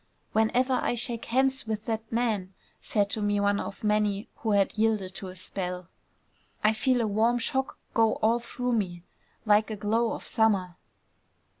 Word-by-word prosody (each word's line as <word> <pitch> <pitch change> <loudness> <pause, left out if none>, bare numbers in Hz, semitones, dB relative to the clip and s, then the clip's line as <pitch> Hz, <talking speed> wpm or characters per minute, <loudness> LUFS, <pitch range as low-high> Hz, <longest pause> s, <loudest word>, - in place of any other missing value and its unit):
"Whenever 240 +4 +2
I - - 0
shake 235 -1 -3
hands 265 0 +1
with 220 -1 -3
that 225 -1 -3
man," 215 -6 -1 0.3
said 205 -2 +1
to 215 - -2
me 205 0 +1
one 200 0 +2
of 200 - -6
many 210 -1 +1
who 220 -2 -1
had 200 -1 +2
yielded 215 -4 +1
to 190 - -6
his 185 0 -3
spell, 180 -1 -4 0.7
"I 215 +1 +5
feel 245 +3 +2
a 225 - +1
warm 225 +4 +2
shock 265 +2 -1 0.2
go 225 -1 +4
all 225 +2 +2
through 245 +1 -3
me, 180 -6 -2 0.4
like 210 +1 +4
a 215 - -3
glow 220 +3 0
of - - -6
summer." 195 -6 +1
220 Hz, 170 wpm, -28 LUFS, 200-230 Hz, 0.7 s, I